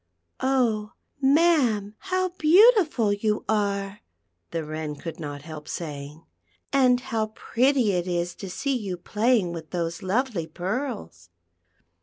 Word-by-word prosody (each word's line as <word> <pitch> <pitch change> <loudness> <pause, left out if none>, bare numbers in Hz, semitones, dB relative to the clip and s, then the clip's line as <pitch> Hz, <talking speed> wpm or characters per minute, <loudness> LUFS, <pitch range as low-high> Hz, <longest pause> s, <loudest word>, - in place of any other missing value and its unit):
"Oh! 235 -6 +1 0.3
ma'am, 270 -8 +3
how 370 -1 -1
beautiful 345 - +5
\'ou 210 +1 -1
are!" 200 -1 -1 0.5
the 165 - -2
W'icn 155 -1 -5
could 165 -1 -7
not 145 -2 -6
help 155 -1 -9
saying; 150 -1 -6 0.5
"and 255 -2 +4
how 225 -4 -2
prett} 265 +4 +1
it 195 -8 +1
is 175 0 -1
to 195 - -7
see 275 +9 -1
you 200 -7 -3
playing 210 -1 +1
with 160 -2 -7
those 170 -2 -3
lovely 195 -3 -1
pearls." 175 - -4
205 Hz, 125 wpm, -25 LUFS, 170-260 Hz, 0.5 s, beautiful